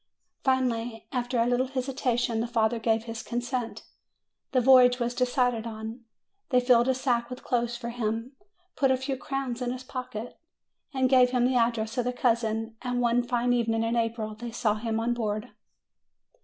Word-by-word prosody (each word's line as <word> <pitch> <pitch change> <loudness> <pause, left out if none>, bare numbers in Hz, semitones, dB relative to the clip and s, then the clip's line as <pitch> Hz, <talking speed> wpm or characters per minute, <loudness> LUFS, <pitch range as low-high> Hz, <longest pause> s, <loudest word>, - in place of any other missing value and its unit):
Finally, 240 -4 0
after 245 -1 -1
a 230 - +3
little 245 +2 +1
hesitation, 255 -3 -1
the 230 - -1
father 230 0 +1
gave 225 0 +1
his 230 -1 -6
consent. 245 0 -3 0.7
The 260 - +3
voyage 250 -1 +6
was 240 -1 -1
decided 245 -2 +1
on. 225 +2 -7 0.4
They 250 - +4
filled 245 -1 +4
a 260 - +2
sack 240 -2 0
with 250 - -8
clothes 240 -1 0
for 235 -1 -5
him, 230 +1 -2 0.4
put 270 - +2
a 260 - +3
few 265 +1 -3
crowns 265 -2 -4
in 245 - -1
his 255 0 -6
pocket, 250 -3 -6 0.5
and 260 -2 +2
gave 255 -1 +5
him 250 -1 +2
the 255 - +2
address 230 0 +1
of 245 - 0
the 250 - -1
cousin; 225 -2 0
and 245 -1 -2
one 240 0 +3
fine 245 0 0
evening 225 -2 +1
in 230 +1 0
April 225 -2 -1
they 235 +3 -7
saw 225 -2 0
him 225 +1 -2
on 235 +1 0
board. 215 0 -3
240 Hz, 180 wpm, -27 LUFS, 230-250 Hz, 0.7 s, voyage